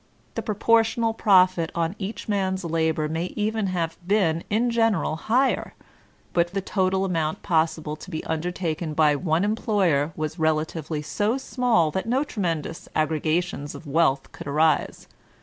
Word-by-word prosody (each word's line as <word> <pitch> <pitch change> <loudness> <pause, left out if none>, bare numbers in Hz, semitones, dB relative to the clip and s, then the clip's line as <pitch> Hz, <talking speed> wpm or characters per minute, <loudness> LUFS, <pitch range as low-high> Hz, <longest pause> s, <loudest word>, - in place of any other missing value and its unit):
The - - -3
proportional 225 +1 +2
profit 185 -6 +4
on 170 +2 -1
each 205 +2 -5
man's 190 -2 0
hbor 160 -2 0
may 160 +3 -2
even 215 0 0
have 165 -3 -2
been 180 -5 +2
in 235 +3 +1
general 225 -8 +1
higher, 245 +11 0 0.6
but 175 +2 +1
the - - +2
total 190 0 0
amount 165 -4 -1
possible 160 -2 0
to 185 - -11
be 160 -4 -4
undertaken 160 -1 -3
by 150 -2 +4
one 165 +2 0
employer 195 - +1
was 155 +2 -4
relatively 155 -1 -1
so 210 - 0
small 245 - +1
that 190 +7 -3
no 255 +4 +2
tremendous 170 - -3
aggrq; 155 0 0
ations 175 -5 -4
of - - -10
wealth 145 -2 +1
could - - -9
arise. 155 +2 +1
175 Hz, 150 wpm, -24 LUFS, 160-205 Hz, 0.6 s, profit